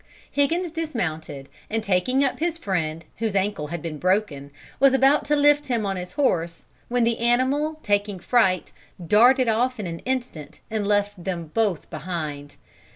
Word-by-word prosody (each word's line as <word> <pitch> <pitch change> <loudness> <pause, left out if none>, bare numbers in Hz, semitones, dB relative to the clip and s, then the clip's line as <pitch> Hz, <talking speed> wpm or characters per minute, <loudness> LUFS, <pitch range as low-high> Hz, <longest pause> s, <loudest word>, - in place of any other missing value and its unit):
"Higgins 330 +5 +1
dismounted, 160 - -4 0.2
and 225 0 -1
taking 215 +8 +2
up 270 - -1
his 335 0 -1
friend, 165 - -2
whose 220 -3 -2
ankle 195 -6 0
had 170 +1 -6
been 155 -3 -5
broken, 180 -7 0 0.3
was 275 0 +5
about 270 +2 +4
to 295 - +2
lift 290 0 +4
him 235 -5 0
on 195 -1 -1
his 180 -1 -6
horse, 175 - 0 0.2
when 245 0 +1
the 230 0 +1
animal, 260 +6 +1
taking 205 -1 0
fright, 190 -2 +1 0.3
darted 245 +6 +5
off 245 +2 +1
in 210 - -3
an 165 -1 -5
instant 235 - -4
and 215 -2 -1
left 205 -2 0
them 170 -4 -4
both 210 -8 0
behind. 150 -5 -5
210 Hz, 160 wpm, -24 LUFS, 175-260 Hz, 0.3 s, was